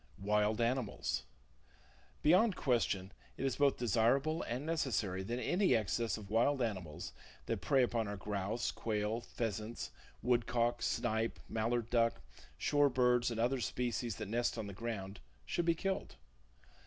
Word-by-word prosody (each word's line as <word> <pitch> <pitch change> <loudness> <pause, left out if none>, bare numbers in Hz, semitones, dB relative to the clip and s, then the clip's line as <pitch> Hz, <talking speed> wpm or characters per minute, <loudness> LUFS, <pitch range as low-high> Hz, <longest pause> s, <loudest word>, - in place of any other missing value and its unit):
Wild 105 +2 +2
Animals. 115 - 0 1.0
—Beyond 185 +7 +5
question, 105 -7 +1 0.3
it 135 - -2
is 135 - 0
both 140 -1 +3
desirable 125 - +2
and 125 +5 -3
necessary 115 - 0
that 115 +6 -3
any 180 - +3
excess 115 +1 0
of 100 -2 -10
wild 130 +5 +3
animals 95 -10 -3 0.3
that 95 - -2
prey 130 +8 +4
upon 115 -3 0
our 100 0 -4
grouse, 100 +3 -2
quail, 110 +1 -1
pheasants, 115 -1 -4
[Page - - -27 0.3
78] - - -7
woodcock, 120 0 +2
snipe, 110 -1 0
mallard 115 +1 -1
duck, 115 -5 +3 0.4
shore 145 -1 +3
birds 125 -1 +3
and 115 -1 -3
other 125 +3 +2
species 120 -2 -1
that 105 - -5
nest 120 +3 0
on 110 - -3
the 100 - -6
ground, 100 -2 -5 0.3
should 170 - -1
be 170 -1 +3
killed. 190 - -2
115 Hz, 150 wpm, -35 LUFS, 105-125 Hz, 1.0 s, Beyond